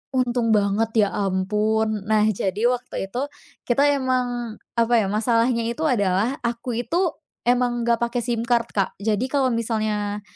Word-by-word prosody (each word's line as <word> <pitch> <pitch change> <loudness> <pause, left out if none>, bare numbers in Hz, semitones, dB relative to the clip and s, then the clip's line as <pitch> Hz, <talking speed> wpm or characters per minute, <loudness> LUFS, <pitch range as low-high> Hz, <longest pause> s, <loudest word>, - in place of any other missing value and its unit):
untung 240 -3 +1
banget, 205 +2 +1 0.2
ya - - -4
ampun. 210 +2 0
Nah, 215 0 +3
jadi 205 +2 0
waktu 245 -5 -3
itu 245 +6 -3 0.5
kita 255 +3 +3
memang 245 -3 -1 0.2
apa 235 +1 +2
ya, 195 - -1
masalahnya 230 +2 +1
itu 235 +6 -3
adalah 215 0 +1
aku 235 0 -2
itu 330 +8 0 0.3
memang 245 -1 +2
enggak 235 0 +3
pakai 235 +1 0
SIM 235 -1 -1
card, 235 -1 +1
Kak. 195 -2 0
Jadi 215 +3 0
kalau 275 -3 +2
misalnya, 215 -3 -1
230 Hz, 150 wpm, -23 LUFS, 210-245 Hz, 0.5 s, Nah